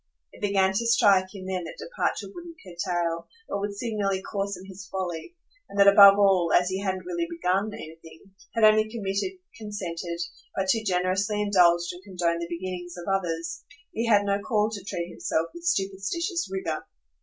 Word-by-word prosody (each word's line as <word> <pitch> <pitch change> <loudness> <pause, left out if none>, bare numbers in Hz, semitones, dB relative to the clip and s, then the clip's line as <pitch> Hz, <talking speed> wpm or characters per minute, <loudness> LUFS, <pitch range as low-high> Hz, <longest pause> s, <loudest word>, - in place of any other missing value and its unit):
It - - -16
began 195 -2 +2
to 230 +4 0
strike 205 -5 +5
him 190 -1 -8
then 185 -1 -2
that 160 - -8
departure - - -2
wouldn't 345 -2 -10
curtail, 170 -2 -2 0.2
but 200 - -2
would 200 0 -4
signally 200 -4 -1
coarsen 195 -2 -4
his 190 +1 -10
folly, 185 - -5 0.3
and 200 - -5
that 200 - +7
above 200 0 +9
all, 190 -4 +4
as 180 +1 -2
he 190 +1 -2
hadn't 190 -2 -2
really 345 -2 -2
"begun" 210 - 0
anything, 165 +1 -12 0.2
had 230 - +1
only 215 0 +6
submitted, 215 - -2 0.3
consented, 175 -5 -5 0.4
but 190 -1 -1
too 225 +4 +3
generously 190 +2 0
indulged 175 -4 +3
and 175 - -11
condoned 175 -3 -1
the 170 - -3
beginnings 175 0 -5
of 175 - -8
others, 170 -3 -2 0.3
he 230 +1 -1
had 205 -3 +4
no 200 0 +1
call 215 0 +1
to 205 -3 -6
treat 175 -3 -4
himself 165 +1 -1
with 345 0 -7
superstitious 335 - -1
rigour. 175 -5 -3
195 Hz, 175 wpm, -26 LUFS, 180-210 Hz, 0.4 s, above